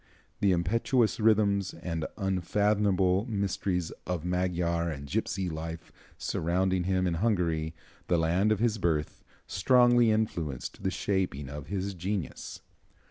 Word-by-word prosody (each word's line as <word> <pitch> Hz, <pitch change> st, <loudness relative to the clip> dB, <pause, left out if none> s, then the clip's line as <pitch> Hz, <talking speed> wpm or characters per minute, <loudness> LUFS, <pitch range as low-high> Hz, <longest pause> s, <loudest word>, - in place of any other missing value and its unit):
The 100 Hz, -, +3 dB
impetuous 110 Hz, +7 st, +1 dB
rhythms 100 Hz, -3 st, +3 dB
and 80 Hz, -3 st, -3 dB
unfathomable 95 Hz, +1 st, +1 dB
mysteries 100 Hz, -4 st, -1 dB, 0.2 s
of 90 Hz, -2 st, -2 dB
Magyar 90 Hz, -2 st, 0 dB
and 70 Hz, -3 st, -5 dB
gipsy 95 Hz, +6 st, -2 dB
life 80 Hz, 0 st, -6 dB, 0.3 s
surrounding 90 Hz, +2 st, 0 dB
him 95 Hz, 0 st, +1 dB
in 90 Hz, -, +1 dB
Hungary, 85 Hz, -5 st, 0 dB, 0.3 s
the 85 Hz, -, +3 dB
land 85 Hz, +6 st, +2 dB
of 110 Hz, -, +3 dB
his 110 Hz, 0 st, +1 dB
birth, 80 Hz, -4 st, -1 dB, 0.2 s
strongly 120 Hz, +2 st, +4 dB
influenced 85 Hz, -, -2 dB
the -, -, 0 dB
shaping 90 Hz, -9 st, -1 dB
of 70 Hz, 0 st, -7 dB
his 100 Hz, 0 st, -2 dB
genius. 95 Hz, -2 st, -4 dB
95 Hz, 125 wpm, -29 LUFS, 85-100 Hz, 0.3 s, strongly